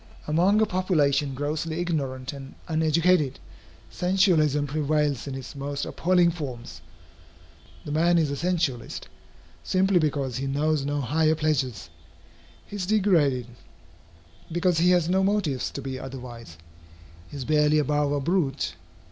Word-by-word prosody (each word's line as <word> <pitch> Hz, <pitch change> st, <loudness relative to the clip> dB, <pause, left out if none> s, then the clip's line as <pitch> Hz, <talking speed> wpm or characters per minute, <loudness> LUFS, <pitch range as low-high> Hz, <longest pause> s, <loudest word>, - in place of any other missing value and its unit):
Among 180 Hz, +7 st, +3 dB
a -, -, +5 dB
population 150 Hz, -8 st, +1 dB
grossly 155 Hz, +4 st, -3 dB
ignorant 135 Hz, -7 st, -2 dB
and 135 Hz, -1 st, -10 dB
uneducated, 160 Hz, -2 st, +2 dB, 0.5 s
sensualism 175 Hz, -6 st, +2 dB
prevails 150 Hz, -2 st, 0 dB
in 135 Hz, -, -4 dB
its 135 Hz, +1 st, -8 dB
most 140 Hz, 0 st, -4 dB
appalling 175 Hz, -1 st, +2 dB
forms. 120 Hz, -, -7 dB, 1.0 s
The 150 Hz, -, -5 dB
man 170 Hz, +3 st, +3 dB
is 155 Hz, -4 st, +1 dB
a -, -, -2 dB
sensualist, 160 Hz, -8 st, -2 dB, 0.6 s
simply 190 Hz, 0 st, +2 dB
because 140 Hz, -5 st, -1 dB
he 135 Hz, +1 st, -3 dB
knows 145 Hz, +1 st, 0 dB
no 145 Hz, 0 st, -1 dB
higher 155 Hz, +4 st, +2 dB
pleasures. 130 Hz, -, -1 dB, 0.7 s
He 205 Hz, -, -8 dB
is 185 Hz, -3 st, -3 dB
degraded, 170 Hz, -, +2 dB, 1.1 s
because 175 Hz, 0 st, +1 dB
he 175 Hz, +2 st, +4 dB
has 175 Hz, -3 st, +3 dB
no 190 Hz, +2 st, +2 dB
motives 190 Hz, -10 st, 0 dB
to 140 Hz, -, -7 dB
be 130 Hz, -1 st, -5 dB
otherwise. 120 Hz, -, -9 dB, 0.7 s
He 145 Hz, -, -8 dB
is 130 Hz, -, -5 dB
barely 150 Hz, 0 st, +3 dB
above 150 Hz, 0 st, +1 dB
a 145 Hz, -, 0 dB
brute. 145 Hz, -3 st, 0 dB
150 Hz, 135 wpm, -25 LUFS, 135-175 Hz, 1.1 s, a